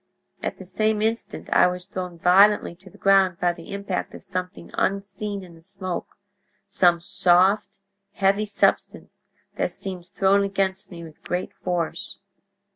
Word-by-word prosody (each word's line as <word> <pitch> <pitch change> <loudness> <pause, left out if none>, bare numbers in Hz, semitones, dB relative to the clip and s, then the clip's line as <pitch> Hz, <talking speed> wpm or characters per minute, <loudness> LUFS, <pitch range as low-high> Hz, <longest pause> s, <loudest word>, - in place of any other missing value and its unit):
At - - -3
the 190 - -10
same 215 +3 0
instant 225 +1 -2
I - - +6
was 180 0 -4
thrown 185 -3 -6
violently 195 +4 +5
to 190 +2 -16
the - - -18
ground 195 -2 +4
by 175 -1 +2
the 170 -1 -12
impact 200 -2 -3
of - - -11
something 185 0 -5
unseen 200 +1 -2
in 175 -2 -13
the 165 - -17
smoke—some 190 0 -2
soft, 185 +3 +3 0.4
heavy 200 +2 +2
substance 205 - -1 0.3
that - - 0
seemed 185 -3 -6
thrown 195 +2 +3
against 195 -1 -1
me 170 -2 -9
with 160 -2 -13
great 180 +1 -3
force. 175 -2 -3
190 Hz, 145 wpm, -24 LUFS, 180-200 Hz, 0.4 s, I